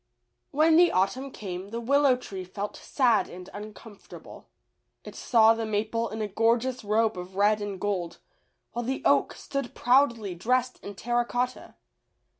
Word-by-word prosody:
When 315 +2 +4
the 350 0 +6
autumn 250 +9 0
came 190 -5 -7
the 230 +2 -4
Willow 275 +2 +3
tree 195 -6 -7
felt 200 +3 -6
sad 250 -5 +1
and 180 +1 -10
uncomfortable. 210 +1 -11 0.6
It - - -10
saw 225 -2 +4
the 225 0 -3
maple 220 +2 -1
in 220 0 -4
a - - -2
gorgeous 230 +4 +1
robe 215 -1 +1
of 180 +1 -9
red 210 +2 +3
and 200 -2 -5
gold, 180 -5 -2 0.5
while 240 - -3
the 265 +3 -3
oak - - +3
stood 275 -3 -5
proudly 235 -6 +2
dressed 250 +8 -1
in 200 - -8
terra 240 +4 0
cotta. 245 +1 -3
225 Hz, 155 wpm, -27 LUFS, 205-250 Hz, 0.6 s, the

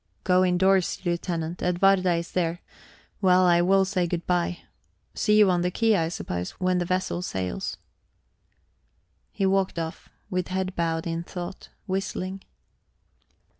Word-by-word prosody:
"Go 185 0 +4
indoors, 185 +1 +2
Lieutenant; 170 -1 -2
Edwarda 185 0 +3
is 170 0 -4
there. 175 -1 -1 0.6
Well, 185 -1 +5
I 175 -1 +5
will 190 +2 +4
say 185 -2 0
good 170 0 -3
bye. 175 -1 0 0.6
See 210 -1 +2
you 210 -3 +6
on 175 -1 +1
the 180 - +1
quay, 225 +3 +2
I 165 -4 +1
suppose, 90 - -4
when 185 -1 +1
the 175 - -1
vessel 185 0 -1
sails." 95 - -3 1.5
He 195 - -1
walked 190 -1 +1
off, 165 -1 -5 0.2
with 185 -1 -2
head 185 0 -2
bowed 165 -1 -1
in 165 0 -2
thought, 180 +1 -7 0.2
whistling. 190 0 -3
180 Hz, 140 wpm, -26 LUFS, 170-190 Hz, 1.5 s, you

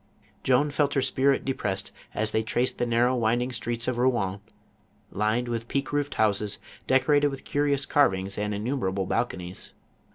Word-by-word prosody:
Joan 130 +3 +3
felt 145 -1 +1
her 135 - +3
spirit 135 +1 +2
depressed 100 -7 -2 0.2
as 110 0 0
they 110 - +1
traced 120 +3 -1
the 120 - +1
narrow 120 +2 +3
winding 120 +2 +1
streets 115 0 -3
of 125 -2 -1
Rouen, 105 -7 +1 0.7
lined 110 +4 0
with 115 -1 -3
peaked 140 +3 -2
roofed 145 0 -1
houses, 105 -1 +1 0.3
deco 130 +2 +3
rated 145 0 +5
with 135 -1 -8
curious 145 -1 +1
carvings 100 -9 +2
and 105 0 -2
innumerable 100 -3 -1
balconies. 90 -5 -3
120 Hz, 160 wpm, -26 LUFS, 105-135 Hz, 0.7 s, rated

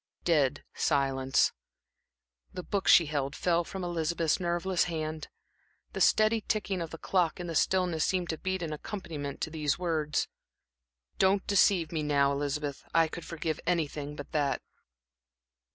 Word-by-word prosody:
Dead 145 -5 +2
silence. 135 -2 +2 1.0
The 180 - -6
book 200 +1 -2
she 170 - +8
held 145 -2 -2
fell 175 -1 +1
from 190 +2 -6
Elizabeth's 165 -1 0
nerveless 175 +1 0
hand. 155 -2 -4 0.7
The - - -3
steady 215 +1 +4
ticking 205 -4 -1
of 165 - -4
the 165 - -8
clock 180 -1 0
in 175 - -4
the 170 - -4
stillness 180 -2 +2
seemed 180 -2 0
to 160 - -5
beat 190 -1 -2
an 155 -2 -3
accompaniment 150 -5 -6
to 160 - -2
these 150 -2 0
words: 160 -4 0 0.9
"Don't 190 +1 +3
deceive 190 -4 +3
me 160 -2 -1
now, 140 -2 +2
Elizabeth; 145 0 -2
I 165 -1 +5
could 165 +1 -8
forgive 160 -2 -3
anything 150 -4 -1
but 145 - -9
that." 145 -3 0
165 Hz, 150 wpm, -30 LUFS, 150-180 Hz, 1.0 s, she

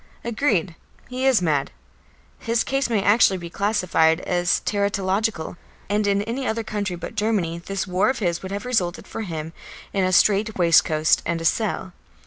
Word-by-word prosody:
Agreed; 220 - 0 0.4
he 255 +1 -1
is 250 -8 +4
mad. 145 -4 +1 0.7
His 230 0 0
case 270 -2 -1
may 215 -4 +1
actually 205 -2 +4
be 170 -1 -8
classified 180 -6 +2
as 175 -1 +1
teratological, 200 -3 -1 0.3
and 210 0 +1
in 200 0 +1
any 245 +5 -3
other 225 +1 -1
country 205 -4 -3
but 170 - -7
Germany 205 -6 -1
this 195 +1 -3
war 185 +4 +1
of 265 - -1
his 175 -4 -1
would 190 - -7
have 200 +2 -4
resulted 185 -9 -1
for - - -6
him 165 -5 -5 0.4
in 195 - +1
a 185 - +1
strait 210 +3 +3
waistcoat 160 -3 +4
and 170 0 -2
a 165 - -5
cell. 190 0 -1
200 Hz, 170 wpm, -23 LUFS, 175-220 Hz, 0.7 s, is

